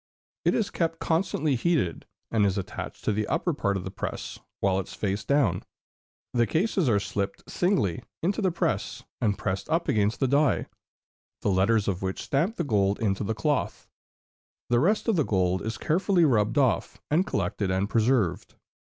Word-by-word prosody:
It - - +3
is 220 - 0
kept 165 -1 -1
constantly 160 -3 0
heated, 140 - 0 0.2
and 110 -2 +3
is 100 -1 +2
attached 95 - -6
to - - +2
the 105 0 -1
upper 175 - 0
part 100 -8 0
of 90 - -5
the 95 - -6
press - - -5 0.2
with 95 -1 +2
its 95 - -6
face 100 0 -2
down; 135 -11 +2 0.7
the 120 -2 +3
cases 185 - +1
are 105 -3 +3
slipped 100 0 -4
singly 175 - 0 0.2
into 195 +6 0
the 190 - +3
press, 170 - -2 0.2
and 105 -3 +1
pressed 95 +1 -3
up 165 +1 +1
against 110 -5 +1
the 135 - +2
die, 140 +2 +2 0.8
the 100 - +2
letters 100 +3 +2
of 95 -2 -1
which 95 0 -3
stamp 165 +10 0
the 175 - -1
gold 100 -7 +1
into 100 -2 0
the 110 +2 -2
cloth; 145 +6 -1 0.8
the 120 - +5
rest 205 - +2
of 220 -5 +2
the 155 - +3
gold 95 -5 +1
is 110 -1 -4
carefully 175 - +2
rubbed 110 -2 +2
off, 130 -5 +1
and 175 +6 +3
collected 100 -3 -1
and 95 +2 +1
preserved. 110 -5 +1
115 Hz, 175 wpm, -27 LUFS, 100-160 Hz, 0.8 s, the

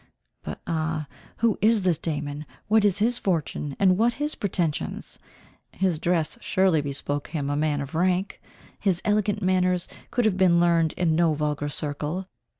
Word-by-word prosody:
But - - -6
ah! 160 -2 -2 0.3
who 230 -2 +1
is 220 -1 +4
this 175 -5 +1
Damon? 150 -1 -4 0.2
What 220 0 +4
is 205 -2 +3
his 235 +4 +1
fortune, 150 -5 -2
and 185 -1 +3
what 235 +1 +3
his 295 +1 -2
pretensions? 170 -7 -3 0.5
His 185 -5 0
dress 170 +5 0
surely 185 -5 +2
bespoke 145 0 -3
him 145 -3 -3
a - - 0
man 150 -1 0
of 140 0 -7
rank. 180 +3 0 0.4
His 190 -3 +1
elegant 210 -1 +1
manners 185 -1 +2 0.2
could 245 -2 0
have 200 -4 +2
been 180 -2 +4
learned 170 -2 +3
in 170 -3 +1
no 165 -2 +3
vulgar 150 -1 -2
circle. 150 +5 -3
175 Hz, 160 wpm, -25 LUFS, 150-195 Hz, 0.5 s, is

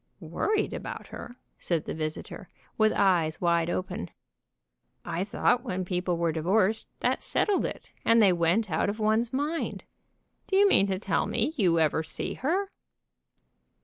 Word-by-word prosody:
"Worried 425 0 -1
about - - -6
her," - - -8 0.3
said 170 -3 -1
the - - -4
visitor, 155 -1 -5 0.3
with 215 0 +3
eyes 175 -5 +2
wide 170 -1 +2
open. 175 - -3 1.0
"I 175 - -2
thought 240 +4 +1
when 185 0 -3
people 180 -1 -1
were 170 -1 +1
divorced, 190 +7 +1
that - - +1
settled 410 -2 +1
it, - - -7
and 230 0 +5
they 200 -4 +6
went 175 +5 +1
out 160 +5 +1
of 205 - -3
one's 220 +2 +1
mind. 295 +5 -2 0.6
Do 385 - -1
you 405 +1 +6
mean 200 - +4
to 190 -1 -1
tell 190 -3 0
me 240 +7 0
you 180 - +3
ever 160 0 +2
see 160 - -5
her?" 380 +9 -1
195 Hz, 155 wpm, -28 LUFS, 170-230 Hz, 1.0 s, they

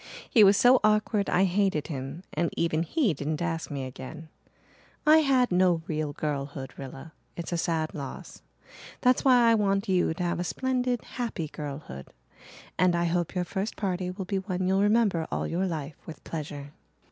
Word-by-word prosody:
He 225 -6 +6
was 200 0 +6
so 250 +1 +6
awkward 210 -1 +2
I 185 - +3
hated 190 -5 +1
him 140 +3 -6
and 170 +2 0
even 165 -1 +1
he 225 - +1
didn't 150 +1 -3
ask 165 -2 -2
me 140 -2 -4
again. 140 +5 -9 0.8
I 305 +1 +7
had 265 -6 +3
no 180 -2 +3
real 155 -2 -2
girlhood, 140 -2 -4
Rilla. 135 +4 -9 0.2
It's 170 0 -5
a 175 - 0
sad 160 -2 -1
loss. 140 -3 -8 0.6
That's 250 0 +3
why 245 -3 +6
I - - +5
want 200 -1 +1
you 185 -3 +2
to 180 - -3
have 175 0 -1
a - - 0
splendid, 250 +4 -1
happy 225 -10 -4
girlhood. 140 - -7 0.7
And 180 -1 +4
I 170 0 +1
hope 175 +1 -1
your 180 -1 0
first 195 +4 -3
party 185 -2 -2
will 185 +1 -5
be 195 +1 -1
one 185 -1 -3
you'll 190 +1 +2
remember 205 -6 +2
all - - -1
your 185 +3 -1
life 155 -4 -5
with 155 - -9
pleasure." 145 -3 -6
175 Hz, 180 wpm, -27 LUFS, 155-205 Hz, 0.8 s, I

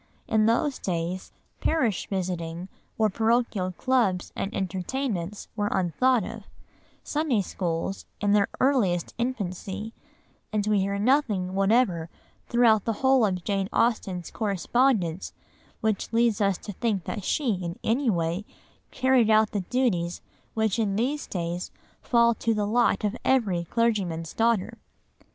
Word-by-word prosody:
In 215 0 +3
those 255 +5 +1
days 175 0 -3 0.3
parish 245 - 0
visiting 180 -2 -3 0.3
or 220 - +4
parochial 220 -3 +1
clubs 220 -5 0
and 195 - -3
entertainments 195 0 -3
were 205 -1 0
unthought 210 +7 +2
of, 220 +1 -7 0.6
Sunday 295 -8 0
schools 175 +1 -3
in 205 -1 +1
their 205 -1 +4
earliest 210 - +2
infancy, 210 -3 -3 0.6
and 210 -2 0
we 210 -1 +2
hear 200 +1 0
nothing 210 -6 +1
whatever 195 -4 +2 0.4
throughout 230 -4 +4
the 225 - +1
whole 265 -2 +5
of 180 -3 -3
Jane 195 0 -1
Austen's 190 -7 0
correspondence 200 -3 0 0.5
which 220 -3 -1
leads 230 -2 +2
us 195 -2 +2
to 205 - -8
think 205 -2 -1
that 205 - -5
she, 255 +2 +1
in 170 +1 -4
any 245 +3 +1
way, 170 0 0 0.5
carried 260 -3 +3
out 215 0 +4
the 205 - -1
duties 180 -5 -1 0.3
which 220 -1 +1
in 205 -3 +1
these 265 +7 -1
days 175 0 -3 0.3
fall 235 -1 +4
to 225 0 -1
the 210 -1 0
lot 235 +2 +2
of 210 +1 0
every 200 -10 +2
clergyman's 185 -7 0
daughter. 230 -1 +1
210 Hz, 135 wpm, -26 LUFS, 185-235 Hz, 0.6 s, whole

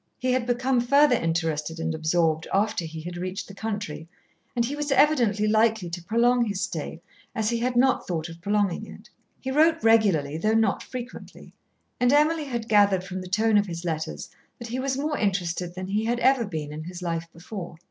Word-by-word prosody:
He 255 0 0
had 250 -1 0
become 250 +1 +1
further 280 +2 +5
interested 165 -3 -1
and 165 0 -1
absorbed 160 0 +1
after 205 -2 +1
he 160 0 -7
had 175 +2 -7
reached 185 +2 -4
the 195 - -11
country, 200 -6 -5 0.5
and 235 -1 +2
he 275 +4 -3
was 295 0 -3
evidently 240 -8 +3
likely 215 -4 +2
to 175 0 -5
prolong 240 +5 +3
his 205 -4 -2
stay 165 -3 -4 0.3
as 220 0 0
he 235 - 0
had 245 +1 -1
not 260 +2 +3
thought 165 -3 -2
of 165 0 -11
prolonging 200 -1 0
it. - - -13 0.3
He 265 - -3
wrote 320 +3 +3
regularly 190 -10 +3
though 215 +5 +1
not 225 -2 +2
frequently, 255 0 -9 0.5
and 245 0 +3
Emily 305 +2 +3
had 235 -4 -4
gathered 200 -4 +4
from 185 0 -6
the 185 - -8
tone 215 +2 +3
of 205 - -1
his 170 0 -6
letters 155 - -3 0.3
that 235 - -8
he 250 +3 -3
was 265 0 -1
more 295 +1 -1
interested 180 -4 -1
than 185 0 -5
he 205 +3 -1
had 240 +1 0
ever 260 -2 +4
been 150 -5 -5
in 155 +1 -7
his 180 +1 -7
life 165 -1 -2
before. 175 +1 -8
205 Hz, 200 wpm, -25 LUFS, 170-240 Hz, 0.5 s, further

